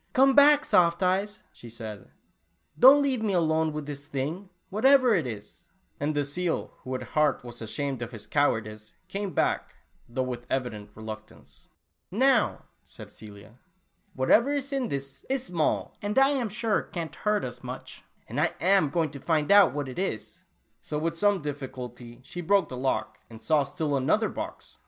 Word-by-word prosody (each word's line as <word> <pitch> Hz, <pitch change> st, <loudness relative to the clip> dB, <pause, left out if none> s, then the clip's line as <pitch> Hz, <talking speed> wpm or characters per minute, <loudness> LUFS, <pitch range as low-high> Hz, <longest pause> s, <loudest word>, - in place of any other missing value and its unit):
" -, -, -40 dB
Come 270 Hz, +1 st, +5 dB
back, 290 Hz, +1 st, +7 dB
Soft 170 Hz, +1 st, +3 dB
Eyes," 195 Hz, +3 st, 0 dB
she 120 Hz, -, -13 dB
said, 110 Hz, -3 st, -8 dB, 0.3 s
" -, -, -32 dB
don't 275 Hz, +3 st, +8 dB
leaye 265 Hz, -4 st, 0 dB
me 205 Hz, -4 st, 0 dB
all 175 Hz, -, +3 dB
alone 160 Hz, 0 st, +1 dB
with 150 Hz, -1 st, -5 dB
this 145 Hz, 0 st, -7 dB
thing, 155 Hz, +7 st, -4 dB, 0.2 s
whateyer 255 Hz, +2 st, +5 dB
it 160 Hz, -8 st, 0 dB
is," 105 Hz, -3 st, -9 dB, 0.3 s
and 145 Hz, +1 st, -1 dB
the 145 Hz, -1 st, +1 dB
seal, 170 Hz, +4 st, -2 dB
who, 130 Hz, 0 st, -5 dB
at 130 Hz, -, -4 dB
heart, 150 Hz, -4 st, +2 dB
was 120 Hz, -1 st, -9 dB
ashamed 135 Hz, +3 st, -3 dB
of 120 Hz, -, -4 dB
his 115 Hz, -4 st, -9 dB
cowardice, 110 Hz, -7 st, -1 dB
came 195 Hz, +1 st, -4 dB
back, -, -, -1 dB, 0.3 s
though 130 Hz, +2 st, -1 dB
with 125 Hz, -1 st, -6 dB
eyident 115 Hz, -6 st, -3 dB
re 110 Hz, -, -10 dB
luctance. 110 Hz, 0 st, -10 dB, 0.4 s
"Now," 255 Hz, +5 st, +2 dB, 0.2 s
said -, -, -13 dB
Celia, 105 Hz, +2 st, -13 dB, 0.6 s
"whatever 220 Hz, -, +4 dB
is 280 Hz, -1 st, -2 dB
in 265 Hz, -3 st, 0 dB
this, 140 Hz, -5 st, -5 dB
is 265 Hz, -1 st, 0 dB
small, 170 Hz, -10 st, -1 dB
and 205 Hz, +3 st, -3 dB
I 270 Hz, 0 st, +6 dB
am 260 Hz, -6 st, 0 dB
sure 220 Hz, +1 st, 0 dB
can't 165 Hz, -4 st, -6 dB
hurt 210 Hz, -1 st, 0 dB
us 125 Hz, -1 st, -8 dB
much, -, -, -8 dB, 0.2 s
and -, -, -2 dB
I -, -, +1 dB
am 190 Hz, -4 st, +3 dB
going 160 Hz, 0 st, 0 dB
to 140 Hz, -, -9 dB
find 155 Hz, +1 st, 0 dB
out 200 Hz, -7 st, +7 dB
what 145 Hz, 0 st, -3 dB
it 130 Hz, -, -6 dB
is." 185 Hz, -, -4 dB, 0.4 s
So 150 Hz, -, -4 dB
with 165 Hz, +2 st, -1 dB
some 200 Hz, -1 st, +2 dB
difficulty, 125 Hz, -4 st, -7 dB
she 175 Hz, -, -7 dB
broke 195 Hz, +3 st, +2 dB
the 130 Hz, -, -6 dB
lock 125 Hz, -4 st, -2 dB
and, 115 Hz, -1 st, -11 dB
saw 150 Hz, +3 st, +2 dB
still 145 Hz, +1 st, -2 dB
another 145 Hz, -, +2 dB
box -, -, -8 dB
155 Hz, 185 wpm, -27 LUFS, 130-205 Hz, 0.6 s, don't